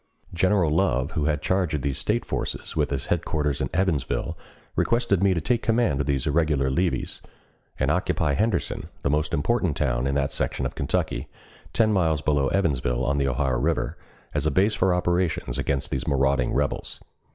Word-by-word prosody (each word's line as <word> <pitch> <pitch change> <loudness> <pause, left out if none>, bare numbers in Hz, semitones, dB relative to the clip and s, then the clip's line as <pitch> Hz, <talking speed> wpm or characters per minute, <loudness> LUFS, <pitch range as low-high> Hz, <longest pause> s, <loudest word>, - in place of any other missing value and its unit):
General 90 -2 +2
Love, 75 -5 +1
who 75 -3 -1
had 75 -1 0
charge 95 -5 +1
of 70 - -3
these 70 -2 -1
State - - 0
forces, - - -4
with - - +1
his 70 -1 -2
headquarters 75 -4 -1
at - - -1
Evansville, 80 -4 0 0.4
requested 115 -6 +2
me 95 -1 +3
to - - +1
take 120 +9 0
command 115 - +1
of 70 - -3
these 70 -3 0
irregular 75 -3 +1
levies, 90 +5 -1 0.6
and - - +2
occupy 70 - +1
Henderson, 105 +2 -1 0.2
the 70 - +1
most 75 +1 0
important 90 - 0
town - - 0
in 70 - 0
that 70 -1 0
section - - -2
of - - -3
Kentucky, - - -1 0.4
ten 110 -2 +3
miles 80 -6 +2
below 70 -2 +2
Evansville 65 -10 0
on 70 +1 +1
the 70 - +1
Ohio 65 -1 0
River, - - 0 0.4
as 75 0 +1
a - - +4
base 95 +8 +3
for 95 -2 +2
operations 90 -1 0
against 70 -1 -1
these 65 -2 -2
marauding 70 -2 +2
rebels. - - -2
75 Hz, 180 wpm, -25 LUFS, 70-95 Hz, 0.6 s, a